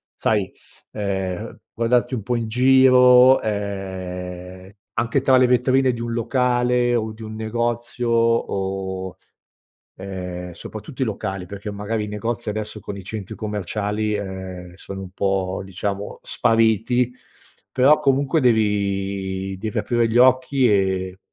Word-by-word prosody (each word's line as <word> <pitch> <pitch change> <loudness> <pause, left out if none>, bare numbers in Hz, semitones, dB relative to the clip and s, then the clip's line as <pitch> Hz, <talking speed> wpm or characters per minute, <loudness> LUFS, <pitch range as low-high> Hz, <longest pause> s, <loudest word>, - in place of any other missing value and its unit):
sai, 105 -3 0 0.4
ehm, 95 -3 -3
guardarti 120 +2 +1
un 120 - -2
po' 120 +5 -1
in 115 -1 -2
giro, 125 +1 +6
ehm, 95 -3 -5 0.2
anche 120 +3 0
tra 130 -1 +5
le 125 0 +5
vetrine 130 +1 +3
di 120 -1 -5
un 115 0 -3
locale 125 0 +1
o 110 -2 -1
di 110 +1 -11
un 110 0 -7
negozio 120 +2 -2
o, 95 -5 0 0.8
ehm, 90 -2 -6
soprattutto 110 - -9
i - - +3
locali, 95 -4 -4
perché 100 +3 -7
magari 105 +2 -3
i - - -8
negozi 110 +2 -3
adesso 110 0 -4
con 100 +1 -6
i 100 - -9
centri 100 0 -6
commerciali, 105 0 -2
ehm, 95 -3 -6
sono 95 +1 -8
un 95 - -8
po', 95 -1 -1
diciamo, 100 +1 -4
spariti, 115 +2 +2 0.6
però 140 +4 +5
comunque 140 +3 +2
devi 100 -4 0
devi 110 +2 -4
aprire 120 -2 +1
gli 115 +1 0
occhi 130 +1 +4
e 95 -2 0
110 Hz, 130 wpm, -22 LUFS, 95-120 Hz, 0.8 s, giro